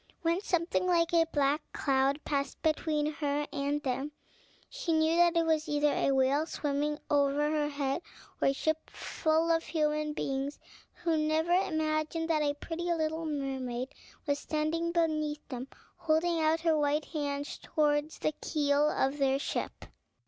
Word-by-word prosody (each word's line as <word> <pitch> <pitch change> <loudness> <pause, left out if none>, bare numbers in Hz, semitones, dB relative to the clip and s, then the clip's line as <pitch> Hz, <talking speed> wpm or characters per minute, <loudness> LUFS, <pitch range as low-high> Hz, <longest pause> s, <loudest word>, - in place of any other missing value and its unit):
When 335 +3 +1
something 350 -1 0
like 340 -1 +2
a 330 -1 +4
black 290 +1 +2
cloud 275 +1 +1
passed 280 -2 -2
between 310 -1 +1
her 295 -1 -1
and 285 +1 -1
them, 270 +3 -2 0.5
she - - -2
knew 315 +1 +3
that 345 -1 +4
it 335 - +3
was 315 -1 +1
either 295 0 +2
a - - +1
whale 270 +4 +2
swimming 295 -1 -1
over 290 +1 +2
her 300 -1 +1
head, 280 +2 -1 0.4
or - - +4
a 275 - +3
ship 315 +3 -1
full 320 +1 0
of 330 0 +3
human 300 -1 0
beings, 275 0 -2 0.5
who 330 -2 +2
never 310 +2 +1
imagined 315 -2 0
that 310 -1 +2
a 290 -1 +1
pretty 345 +3 -4
little 320 0 -1
mermaid 265 -3 -3 0.3
was 285 -1 0
standing 320 +3 -1
beneath 310 -3 0
them, 255 -1 -5 0.3
holding 330 +1 +1
out 320 +1 +2
her 330 -2 +3
white 295 0 +1
hands 285 -2 -3
towards 300 0 0
the 310 - -1
keel 290 -1 +2
of 270 +1 0
their 270 -1 +3
ship. 280 - -4
305 Hz, 155 wpm, -30 LUFS, 285-325 Hz, 0.5 s, a